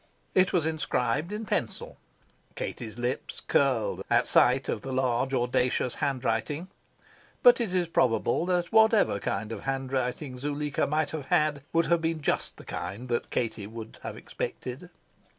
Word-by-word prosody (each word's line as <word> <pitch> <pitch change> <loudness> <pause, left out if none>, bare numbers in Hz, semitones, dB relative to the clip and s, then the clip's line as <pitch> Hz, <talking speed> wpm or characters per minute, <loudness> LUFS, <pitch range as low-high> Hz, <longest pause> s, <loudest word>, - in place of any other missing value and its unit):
It 185 0 +4
was 170 -4 +2
inscribed 155 - 0
in 215 +1 -4
pencil. - - -2 0.6
Katie's 110 -1 -5
lips 120 +1 -3
curled - - +1
at - - +3
sight - - +4
of - - -2
the 135 - -5
large, 130 0 +1
audacious 125 -1 +1
handwriting. 140 +4 -1 0.7
But - - +7
it 220 -6 -1
is 180 -2 +1
probable 130 +2 +2
that 175 -1 0
whatever 220 - +5
kind 105 +2 -2
of 110 -3 -5
handwriting 130 0 -2
Zuleika 145 +1 -1
might 150 0 0
have 155 -4 -5
had 150 -1 +2
would 165 0 +3
have 170 -1 +2
been 165 -1 -1
just - - -1
the - - -12
kind 120 +6 -5
that 120 - -1
Katie 110 -4 -2
would 110 0 -9
have - - -6
expected. 130 +8 -5
135 Hz, 150 wpm, -28 LUFS, 125-165 Hz, 0.7 s, But